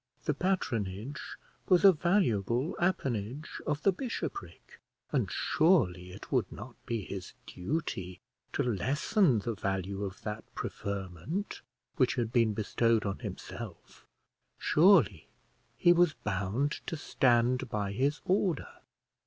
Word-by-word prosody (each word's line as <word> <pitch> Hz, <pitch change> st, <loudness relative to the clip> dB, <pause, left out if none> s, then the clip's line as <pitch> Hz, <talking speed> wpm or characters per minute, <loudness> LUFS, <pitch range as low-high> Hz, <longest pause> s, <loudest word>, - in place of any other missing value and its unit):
The 150 Hz, -, +2 dB
patronage 130 Hz, -, -2 dB, 0.5 s
was 185 Hz, +1 st, +5 dB
a 195 Hz, -, +11 dB
valuable 135 Hz, -, +1 dB
appanage 135 Hz, -, -2 dB
of 150 Hz, -, -1 dB
the 195 Hz, -, +5 dB
bishopric; 255 Hz, -, -6 dB, 0.3 s
and -, -, +1 dB
surely 95 Hz, -, +2 dB
it 95 Hz, +3 st, -11 dB
would 125 Hz, -8 st, +1 dB
not 120 Hz, +4 st, -9 dB
be 115 Hz, -3 st, -2 dB
his 95 Hz, -1 st, -7 dB
duty 90 Hz, -, -4 dB, 0.3 s
to 140 Hz, -, +1 dB
lessen 135 Hz, -, +2 dB
the 115 Hz, +3 st, -2 dB
value 100 Hz, -1 st, -2 dB
of 95 Hz, -1 st, -5 dB
that 110 Hz, 0 st, -4 dB
preferment 100 Hz, -, -4 dB, 0.4 s
which 130 Hz, -2 st, +3 dB
had 120 Hz, -2 st, -2 dB
been 115 Hz, -4 st, +3 dB
bestowed 115 Hz, +1 st, +1 dB
on 100 Hz, -1 st, -2 dB
himself; -, -, -8 dB, 0.5 s
surely 150 Hz, -, +4 dB, 0.5 s
he 175 Hz, -, +6 dB
was 175 Hz, -4 st, +3 dB
bound 105 Hz, +5 st, -1 dB, 0.2 s
to 165 Hz, -, -3 dB
stand 125 Hz, -3 st, +2 dB
by 100 Hz, -2 st, -2 dB
his 140 Hz, +8 st, 0 dB
order. 185 Hz, -5 st, +1 dB
120 Hz, 120 wpm, -31 LUFS, 100-155 Hz, 0.5 s, a